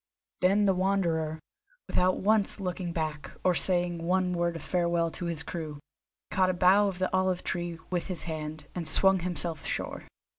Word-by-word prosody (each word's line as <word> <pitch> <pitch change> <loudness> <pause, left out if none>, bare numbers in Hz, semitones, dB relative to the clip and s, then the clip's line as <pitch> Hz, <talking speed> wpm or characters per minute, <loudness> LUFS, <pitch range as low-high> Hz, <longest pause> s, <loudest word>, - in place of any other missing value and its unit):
Then 200 +3 +3
the 195 - +4
Wanderer, 170 -5 0 0.5
without 185 +1 +2
once 210 0 +2
looking 180 -2 -3
back, 155 -4 -3
or 185 - +4
saying 175 -1 +1
one 180 +1 +1
word 170 -1 0
of 165 - -7
farewell 170 -2 +1
to 175 - -6
his 165 -2 -1
crew, 155 -4 -6 0.5
caught 185 0 +3
a 185 - 0
bough 190 +3 +5
of 190 -2 -3
the 185 0 -1
olive 185 -1 +1
tree 175 -1 -3
with 175 -2 -1
his 185 -3 -3
hand, 155 -2 -5
and 170 -3 -3
swung 190 +4 +5
himself 170 -2 -2
ashore. - - -4
175 Hz, 175 wpm, -29 LUFS, 165-185 Hz, 0.5 s, bough